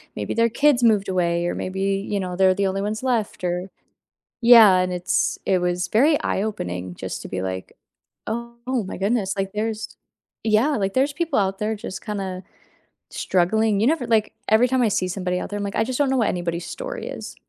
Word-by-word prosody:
maybe -, -, -3 dB
their 230 Hz, 0 st, +4 dB
kids 270 Hz, +1 st, +3 dB
moved 210 Hz, -4 st, +3 dB
away 175 Hz, -2 st, 0 dB
or -, -, -2 dB
maybe, 190 Hz, +1 st, -4 dB, 0.3 s
you 205 Hz, -, 0 dB
know, 180 Hz, -2 st, -4 dB
they're 185 Hz, 0 st, +4 dB
the 200 Hz, 0 st, 0 dB
only 195 Hz, +1 st, -2 dB
ones 215 Hz, +4 st, -3 dB
left 230 Hz, -7 st, -1 dB
or 180 Hz, +1 st, -2 dB, 0.7 s
Yeah, 230 Hz, -5 st, +8 dB
and 185 Hz, 0 st, 0 dB
it's 180 Hz, 0 st, 0 dB
it 190 Hz, -, +3 dB
was 180 Hz, 0 st, -1 dB
very 285 Hz, -, +3 dB
eye-opening 90 Hz, -, -3 dB
just -, -, -6 dB
to -, -, -7 dB
be 95 Hz, -, -4 dB
like, 95 Hz, 0 st, -5 dB, 0.5 s
"Oh 235 Hz, +1 st, -3 dB
my -, -, -6 dB
goodness, 200 Hz, 0 st, 0 dB
like, 195 Hz, 0 st, -2 dB
there's" 220 Hz, +1 st, -3 dB, 0.5 s
Yeah, 225 Hz, +7 st, +2 dB
like, 195 Hz, -2 st, -1 dB
"There's 270 Hz, +3 st, +2 dB
people 320 Hz, -3 st, 0 dB
out 195 Hz, -1 st, 0 dB
there 215 Hz, +1 st, -1 dB
just 200 Hz, -2 st, -8 dB
kinda 195 Hz, -3 st, -4 dB, 0.7 s
struggling." 205 Hz, +3 st, +1 dB
You 230 Hz, -, +3 dB
never 305 Hz, -6 st, +1 dB
like, 220 Hz, -2 st, +2 dB, 0.2 s
every 220 Hz, +3 st, +5 dB
time 260 Hz, 0 st, +2 dB
I 230 Hz, -, +4 dB
see 185 Hz, -2 st, 0 dB
somebody 180 Hz, -1 st, -2 dB
out -, -, -5 dB
there, 205 Hz, -, -3 dB
I'm -, -, -3 dB
like, 200 Hz, 0 st, -4 dB
"I -, -, +2 dB
just 255 Hz, +3 st, -3 dB
don't 280 Hz, -2 st, +3 dB
know 265 Hz, -, +1 dB
what 225 Hz, -4 st, +2 dB
anybody's 175 Hz, -1 st, -3 dB
story -, -, -6 dB
is." -, -, -7 dB
205 Hz, 205 wpm, -23 LUFS, 185-235 Hz, 0.7 s, Yeah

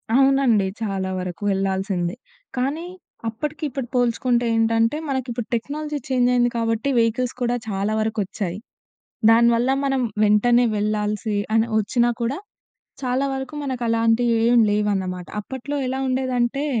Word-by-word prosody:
అవునండి. 270 Hz, -7 st, +4 dB
చాలా 195 Hz, -3 st, -2 dB
వరకు 180 Hz, 0 st, -6 dB
వెళ్ళాల్సిందే. 190 Hz, -1 st, -1 dB, 0.4 s
కానీ, 285 Hz, +7 st, -1 dB, 0.4 s
అప్పటికి 300 Hz, +7 st, -5 dB
ఇప్పుడు 260 Hz, -2 st, -4 dB
పోల్చుకుంటే 245 Hz, 0 st, +2 dB
ఏంటంటే, 225 Hz, +4 st, +2 dB
మనకిప్పుడు 245 Hz, -3 st, -3 dB
టెక్నాలజీ 295 Hz, +5 st, -3 dB
చేంజయింది 245 Hz, -1 st, +3 dB
కాబట్టి, 230 Hz, +3 st, 0 dB
వెహికల్స్ 235 Hz, +2 st, 0 dB
కూడా 245 Hz, 0 st, +1 dB
చాలా 200 Hz, +2 st, -1 dB
వరకొచ్చాయి. 205 Hz, -4 st, -2 dB, 0.7 s
దాని 235 Hz, +1 st, +6 dB
వల్ల 240 Hz, +3 st, +1 dB, 0.2 s
మనం 270 Hz, -1 st, +1 dB, 0.2 s
వెంటనే 240 Hz, +4 st, +4 dB
వెళ్ళాల్సి 210 Hz, 0 st, -1 dB, 0.2 s
అని 225 Hz, +1 st, +3 dB
ఒచ్చినా 240 Hz, +4 st, +1 dB
కూడా 245 Hz, +6 st, -1 dB, 0.7 s
చాలా 255 Hz, +2 st, 0 dB
వరకు 265 Hz, +2 st, -5 dB
మనకలాంటియేం 235 Hz, -1 st, +2 dB
లేవన్నమాట. 195 Hz, -4 st, -1 dB
అప్పట్లో 265 Hz, +5 st, -6 dB
ఎలా 265 Hz, +1 st, -2 dB
ఉండేదంటే, 255 Hz, +1 st, 0 dB
235 Hz, 115 wpm, -22 LUFS, 210-255 Hz, 0.7 s, దాని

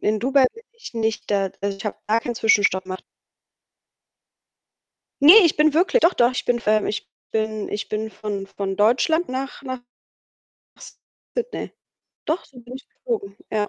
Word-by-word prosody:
In 215 Hz, 0 st, 0 dB
Dubai 265 Hz, +1 st, +4 dB
bin 460 Hz, -, -14 dB, 0.2 s
ich 250 Hz, -, -10 dB
nicht 220 Hz, -2 st, -2 dB
da 195 Hz, -1 st, +1 dB
also, 200 Hz, 0 st, -2 dB
ich 195 Hz, -, -10 dB
habe 210 Hz, -, -3 dB
gar 220 Hz, +2 st, +2 dB
keinen 240 Hz, 0 st, -4 dB
Zwischenstopp 205 Hz, -4 st, +3 dB
gemacht. 185 Hz, 0 st, -6 dB, 2.2 s
Ne, 310 Hz, +5 st, +10 dB
ich 325 Hz, -, +3 dB
bin 300 Hz, 0 st, +3 dB
wirklich 375 Hz, +8 st, +3 dB
doch 345 Hz, +2 st, +4 dB
doch, 240 Hz, +1 st, +3 dB
ich -, -, -3 dB
bin 245 Hz, -1 st, +1 dB
v -, -, -17 dB
ähm, 215 Hz, -1 st, +3 dB
ich 210 Hz, -, -4 dB, 0.2 s
bin 215 Hz, -1 st, -2 dB
ich 205 Hz, -1 st, -4 dB
bin 220 Hz, +1 st, -3 dB
von 205 Hz, -2 st, -5 dB
von 195 Hz, -1 st, -4 dB
Deutschland 265 Hz, +11 st, +2 dB
nach 265 Hz, +2 st, -5 dB
nach 255 Hz, -2 st, -5 dB, 1.6 s
Sydney. 485 Hz, 0 st, -4 dB, 0.5 s
Doch, 325 Hz, +3 st, -1 dB
so 255 Hz, -2 st, -15 dB
bin 240 Hz, +1 st, -11 dB
ich 270 Hz, -, -15 dB
geflogen, 435 Hz, -, -5 dB
ja. 210 Hz, -1 st, 0 dB
225 Hz, 170 wpm, -22 LUFS, 205-275 Hz, 2.2 s, Ne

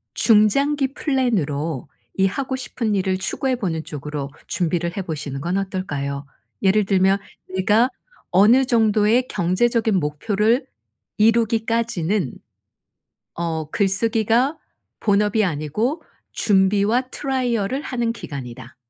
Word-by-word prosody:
중장기 270 Hz, +6 st, +3 dB
플랜으로 165 Hz, -, -1 dB, 0.3 s
이 195 Hz, -, +3 dB
하고 260 Hz, +7 st, -2 dB
싶은 235 Hz, -4 st, -2 dB
일을 190 Hz, -1 st, 0 dB
추구해 255 Hz, +7 st, -1 dB
보는 170 Hz, -9 st, -3 dB
쪽으로 150 Hz, -3 st, -5 dB, 0.2 s
준비를 170 Hz, +1 st, -1 dB
해 -, -, 0 dB
보시는 145 Hz, -5 st, -5 dB
건 175 Hz, +4 st, -1 dB
어떨까요? 145 Hz, -8 st, -3 dB, 0.4 s
예를 200 Hz, +2 st, +4 dB
들면 190 Hz, 0 st, +3 dB, 0.4 s
'내가 210 Hz, +6 st, +3 dB, 0.4 s
어느 220 Hz, +8 st, +5 dB
정도의 225 Hz, 0 st, +3 dB
경제적인 220 Hz, +4 st, +1 dB
목표를 205 Hz, -, +1 dB, 0.5 s
이루기까지는 225 Hz, -, +1 dB, 1.0 s
어 160 Hz, -3 st, -3 dB
글쓰기가 225 Hz, +7 st, +1 dB, 0.4 s
본업이 210 Hz, +1 st, +2 dB
아니고 190 Hz, -, -2 dB, 0.3 s
준비와 205 Hz, +3 st, +3 dB
트라이얼을 255 Hz, -2 st, -1 dB
하는 240 Hz, -3 st, -1 dB
기간이다.' 130 Hz, -, -8 dB
205 Hz, 265 characters per minute, -21 LUFS, 170-235 Hz, 1.0 s, 어느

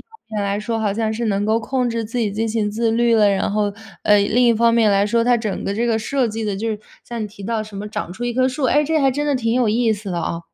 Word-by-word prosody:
方 -, -, -21 dB, 0.3 s
面 205 Hz, -, 0 dB
来 200 Hz, 0 st, -1 dB
说， 225 Hz, +2 st, -3 dB
好 205 Hz, -2 st, 0 dB
像 220 Hz, 0 st, -1 dB
是 235 Hz, +1 st, -2 dB
能 200 Hz, -1 st, 0 dB
够 225 Hz, +1 st, +2 dB
控 250 Hz, +2 st, -1 dB
制 230 Hz, -1 st, -2 dB
自 230 Hz, +3 st, -4 dB
己 210 Hz, -4 st, 0 dB
进 225 Hz, +2 st, -1 dB
行 215 Hz, -2 st, 0 dB
自 225 Hz, +2 st, 0 dB
律 235 Hz, 0 st, +3 dB
了； 210 Hz, -2 st, +5 dB
然 195 Hz, -1 st, 0 dB
后， 205 Hz, -1 st, 0 dB, 0.3 s
呃， 210 Hz, 0 st, +5 dB
另 220 Hz, +5 st, +2 dB
一 235 Hz, -, +5 dB
方 230 Hz, +1 st, +3 dB
面 225 Hz, -3 st, +4 dB
来 200 Hz, +1 st, +3 dB
说， 230 Hz, +2 st, +2 dB
它 245 Hz, 0 st, +3 dB
整 215 Hz, -3 st, -3 dB
个 200 Hz, -, -2 dB
这 235 Hz, +3 st, -1 dB
个 225 Hz, -1 st, +2 dB
设 250 Hz, +3 st, 0 dB
计 220 Hz, 0 st, -4 dB
得 200 Hz, -2 st, -2 dB
就 225 Hz, +3 st, -2 dB
是， 215 Hz, -, -1 dB, 0.3 s
像 235 Hz, -2 st, -5 dB
你 -, -, -2 dB
提 200 Hz, -1 st, -11 dB
到 225 Hz, 0 st, -1 dB
什 210 Hz, -2 st, -10 dB
么 205 Hz, +1 st, -5 dB
长 195 Hz, -4 st, -5 dB
出 240 Hz, +6 st, -6 dB
一 240 Hz, -1 st, -2 dB
棵 255 Hz, 0 st, +3 dB
树， 260 Hz, +1 st, -3 dB
哎， 295 Hz, +4 st, +3 dB
这 315 Hz, +1 st, +1 dB
还 275 Hz, -2 st, +3 dB
真 290 Hz, +3 st, -1 dB
的 290 Hz, -2 st, +1 dB
挺 230 Hz, -1 st, 0 dB
有 250 Hz, -3 st, +2 dB
意 225 Hz, +1 st, +2 dB
思 205 Hz, -2 st, -6 dB
的 175 Hz, -, -2 dB
啊。 170 Hz, 0 st, -3 dB
225 Hz, 335 characters per minute, -20 LUFS, 210-240 Hz, 0.3 s, 了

